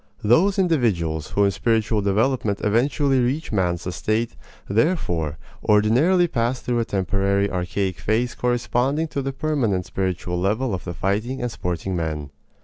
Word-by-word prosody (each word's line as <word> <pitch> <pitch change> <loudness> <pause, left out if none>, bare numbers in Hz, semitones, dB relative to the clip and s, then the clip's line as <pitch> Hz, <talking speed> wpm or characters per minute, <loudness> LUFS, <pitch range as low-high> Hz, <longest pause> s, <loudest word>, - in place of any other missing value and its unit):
Those 175 - +4
individuals 105 - +1
who 100 - +2
in 100 - +3
spiritual 110 0 +1
development 105 +1 +1
eventually 135 +5 +2
reach 130 +6 -1
man's 90 -5 0
estate, 110 +5 -1 0.3
therefore, 90 - 0 0.3
ordinarily 125 - +4
pass 120 -3 -1
through 120 -1 -1
a 115 - 0
temporary 100 0 0
archaic 90 0 -2
phase 120 +3 0
corresponding 125 +5 0
to 140 - -2
the 135 0 -2
permanent 130 - 0
spiritual 90 -2 -2
level 110 +6 0
of 95 - -4
the 85 -2 -5
fighting 110 +9 -1
and 120 -1 -2
sporting 90 0 -3
men. 75 -4 -3
110 Hz, 140 wpm, -23 LUFS, 95-130 Hz, 0.3 s, Those